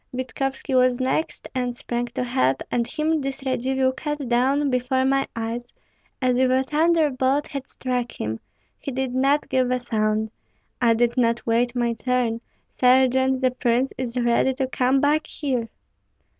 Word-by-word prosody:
Vitkovski 270 +2 -3
was 255 -1 +3
next, 260 +5 -1
and 250 -2 -2
sprang 240 0 -3
to 240 +1 -3
help; 135 - +1
and 235 -1 0
him 310 0 0
this 270 0 -4
Radzivill 260 0 +1
cut 295 -2 -4
down 265 +4 +2
before 255 +1 +1
my 270 0 +2
eyes, 230 +2 -4 0.5
as 255 -2 +1
if 260 0 +3
a 260 +1 +3
thunderbolt 295 -2 +2
had 275 -2 -6
struck 250 -2 -3
him. 110 +1 -3 0.4
He 275 - -5
did 260 -1 -2
not 275 +3 +2
give 255 -1 +1
a 255 - +1
sound. 215 -2 -1 0.5
I 230 -2 +4
did 240 +2 +1
not 235 -1 +1
wait 235 +2 +1
my 240 -1 +1
turn. 230 0 -1 0.4
Sergeant, 260 +1 +4
the 255 -1 +3
prince 250 +1 0
is 250 -1 -3
ready 240 +2 +2
to 265 0 0
come 260 +1 +1
back 300 +2 +2
here." 255 -6 -2
255 Hz, 160 wpm, -23 LUFS, 240-265 Hz, 0.5 s, I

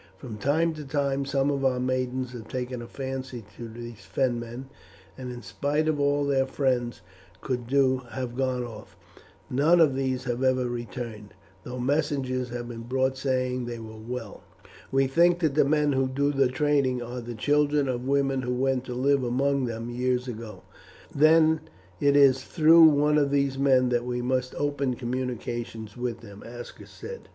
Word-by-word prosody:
From 115 -6 -8
time 160 +7 +2
to 155 -1 -7
time 140 0 -1
some 135 +1 +1
of 140 -1 -2
our 130 -2 +2
maidens 130 0 -1
have 120 -3 -9
taken 125 -1 -4
a 120 - -8
fancy 130 -4 -6
to 120 - -7
these 120 0 -9
Fenmen, 120 -1 -2 0.5
and 130 -1 -6
in 120 -1 -8
spite 145 +10 -1
of 155 -2 +1
all 145 0 +2
their 135 -1 +2
friends 125 -4 -1 0.4
could 125 -3 -3
do 130 0 +3
have 125 -2 -5
gone 130 -1 0
off. 110 -3 -10 0.5
None 150 +7 +3
of 155 -5 +5
these 130 -1 -1
have 125 0 -2
ever 130 -1 +2
returned, 120 -3 -6 0.3
though 125 +1 -6
messages 130 -2 0
have 120 0 -5
been 115 -1 -7
brought 130 +2 0
saying 130 -2 -1
they 120 0 -5
were 110 -1 -9
well. 115 0 -7 0.5
We 135 0 +3
think 170 +6 +4
that 155 -4 +2
the 150 - +4
men 150 0 +2
who 135 -1 +1
do 140 +2 0
the 135 -2 +3
trading 130 -2 +1
are 120 +1 -6
the 120 0 -7
children 145 +3 +2
of 125 0 -3
women 135 -1 +1
who 125 0 -2
went 130 0 0
to 125 - -5
live 135 +1 +2
among 135 +2 +1
them 115 0 -4
years 125 +1 0
ago." 115 -2 -7 0.5
"Then 155 +1 +5 0.4
it 140 0 +3
is 135 -2 +5
through 165 +1 +6
one 150 0 +4
of 140 -1 +2
these 140 -1 +1
men 130 -2 +4
that 120 -1 +1
we 125 0 -2
must 130 0 -1
open 140 -3 -1
communications 120 -3 -4
with 120 -2 -4
them," 100 -3 -12
Aska 120 +1 -10
said. 475 0 -10
130 Hz, 180 wpm, -26 LUFS, 120-140 Hz, 0.5 s, through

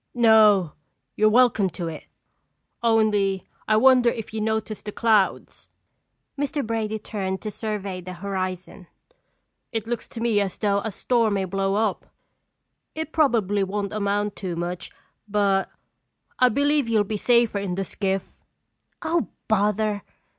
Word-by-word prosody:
"No, 215 -7 +5 0.4
you're 215 0 +4
welcome 225 -4 +4
to 175 -1 -5
it, 160 -2 -7 0.7
only 210 -4 +2 0.2
I 215 - +4
wonder 250 0 +6
if 225 -2 -6
you 220 - -2
noticed 220 -1 -2
the 210 - -4
clouds." 215 -3 +1 0.7
Mr. 290 -1 -2
Brady 220 -1 -2
turned 190 -3 -4
to 215 - -4
survey 200 -4 -4
the 180 +1 -8
horizon. 185 0 -5 0.8
"It 225 -2 -3
looks 235 0 -4
to 230 - -9
me 230 -3 +2
as 195 -2 -3
though 200 -2 +1
a 220 - -3
storm 225 0 +1
may 195 -1 0
blow 195 +1 -1
up. 215 -2 -1 0.9
It 315 0 -4
probably 220 -10 +2
won't 200 +1 -3
amount 205 0 -1
to 180 -3 -4
much 175 +1 -4 0.4
but 200 -2 +1 0.7
I 255 - +6
believe 285 0 +1
you'll 220 -2 +3
be 215 +1 -4
safer 235 -2 +3
in 195 -3 -3
the 195 +1 -2
skiff." 195 0 -3 0.6
"Oh, 330 +1 0 0.2
bother!" 210 -1 +1
210 Hz, 140 wpm, -24 LUFS, 195-225 Hz, 0.9 s, wonder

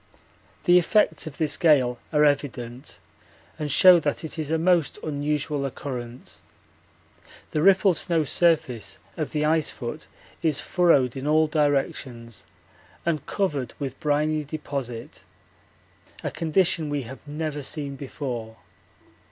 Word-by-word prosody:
The 180 0 +6
effects 210 -1 +2
of 150 - -8
this 155 -2 -1
gale 130 -7 +3
are 150 -1 +4
evident 135 -3 -2 0.6
and 150 -1 -2
show 180 +5 +7
that 145 0 -2
it 160 +1 -7
is 150 -2 -3
a 160 - +2
most 170 -2 +2
unusual 150 -1 -1
occurrence. 125 -2 -7 1.1
The 150 - 0
rippled 190 -1 +5
snow 165 -3 +1
surface 150 - +1 0.2
of - - -3
the 150 0 0
ice 155 -1 +2
foot 130 +5 -6 0.3
is 155 -4 +1
furrowed 145 -9 +3
in 135 +2 -4
all 155 +1 +4
directions 135 -6 -2 0.6
and 165 -4 0
covered 145 - -2
with 135 -2 -5
briny 150 +1 +1
deposit 140 -6 -6 1.0
a - - -2
condition 165 -1 +1
we 145 -2 -2
have 130 +3 -9
never 150 0 -4
seen 140 0 -4
before. 125 -5 -6
150 Hz, 125 wpm, -25 LUFS, 135-160 Hz, 1.1 s, show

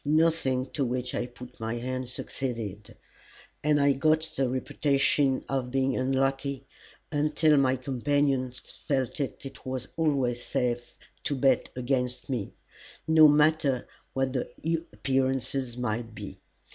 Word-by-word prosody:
Nothing 150 -4 +2
to 145 - -1
which 125 0 -2
I 120 - -1
put 125 0 -12
my 115 +1 -2
hand 130 +1 -3
succeeded, 115 -6 -5 0.7
and 150 0 +3
I 140 0 +5
got 155 +3 +3
the 135 -2 +1
reputation 135 +1 +1
of 130 -2 -1
being 135 0 +1
unlucky, 135 +1 0 0.5
until 150 +1 +3
my 130 -1 +4
companions 130 0 0
felt 135 -1 -3
it 135 -1 -5
was 130 -1 -4
always 135 -7 +1
safe 120 -1 -2 0.3
to 145 - +1
bet 130 -1 +3
against 125 0 -1
me, 115 -6 -2 0.6
no 160 -1 +8
matter 150 -3 +3 0.3
what 135 -1 0
the 125 - -2 0.4
appearances 130 +1 -1
might 115 -1 -3
be. - - -8
130 Hz, 125 wpm, -28 LUFS, 125-140 Hz, 0.7 s, no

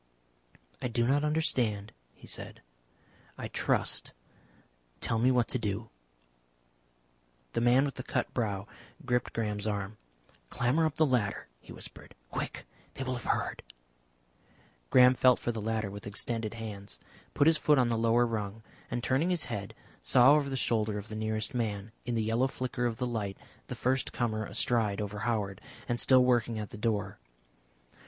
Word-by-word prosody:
"I - - 0
do 120 0 +1
not 140 +4 +3
understand," 130 -10 +1 0.2
he - - -15
said. - - -9 0.7
"I - - -4
trust. - - 0 0.9
Tell 115 - 0
me 125 +3 +4
what 125 -2 +3
to 130 - -1
do." 105 +1 -3 1.6
The - - 0
man 125 +3 +5
with 140 - -3
the - - -6
cut - - -2
brow 100 -5 -1 0.4
gripped 125 -1 0
Graham's 105 -2 -2
arm. 105 0 -3 0.5
"Clamber 140 +7 +2
up 155 - -5
the 155 - +4
ladder," 120 -8 0
he - - -14
whispered. - - -10 0.2
"Quick. - - -4 0.3
They 135 - -3
will 130 -1 -2
have 120 -2 -6
heard - - -2 0.7
" - - -33
Graham 125 0 +7
felt 125 -1 +5
for 120 - -2
the 110 -2 -4
ladder 110 -2 -1
with 100 0 -8
extended 110 +2 -2
hands, 105 -3 -6 0.4
put 145 - +4
his 160 0 +6
foot 150 -1 +4
on 125 -2 +3
the 115 - +1
lower 115 +1 +4
rung, 110 -1 -3 0.3
and, 120 - -3
turning 135 +7 +2
his 175 -4 +1
head, 100 -4 -5 0.3
saw 130 +3 +6
over 145 -2 +2
the 135 - -2
shoulder 110 -3 +1
of 105 +1 -7
the 110 - -5
nearest 110 +3 -2
man, 110 -3 -2 0.2
in 120 - 0
the 110 - +1
yellow 115 +4 +2
flicker 125 -2 -2
of 115 -2 -3
the 125 - -1
light, 105 -5 -3 0.3
the - - -5
first 130 +1 0
comer 110 -3 -1
astride 110 -1 +1
over 105 0 -4
Howard 105 -4 -1 0.3
and 120 0 -1
still 130 0 +6
working 120 -2 +2
at 105 -1 -5
the - - -8
door. 105 - -1
115 Hz, 170 wpm, -30 LUFS, 105-125 Hz, 1.6 s, Graham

